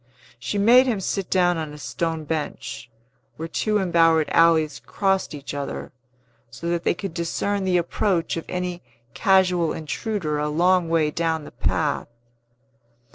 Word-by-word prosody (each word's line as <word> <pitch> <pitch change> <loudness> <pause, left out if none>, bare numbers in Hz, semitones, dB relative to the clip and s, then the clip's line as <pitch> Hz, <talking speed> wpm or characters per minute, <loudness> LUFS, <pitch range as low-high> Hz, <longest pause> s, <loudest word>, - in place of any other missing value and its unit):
She 205 - -3
made 240 +6 +6
him 225 -5 0
sit 195 0 -2
down 175 -2 +3
on 155 -2 -5
a - - -9
stone 160 +4 -3
bench, 150 -6 -4 0.5
where 160 - -5
two 210 +6 0
embowered 165 -4 +3
alleys 160 -3 +3
crossed 195 -7 0
each 140 -3 -7
other; 140 -1 -5 0.6
so 170 +9 -6
that 170 0 -1
they - - +1
could 195 -1 -6
discern 190 +4 -1
the 185 -1 +2
approach 175 0 0
of 165 - -5
any 180 -1 -3 0.3
casual 180 -4 +3
intruder 160 0 -3
a 150 0 -1
long 175 +2 +2
way 160 -2 +2
down 160 -1 -1
the - - -11
path. - - -1
170 Hz, 150 wpm, -23 LUFS, 155-190 Hz, 0.6 s, made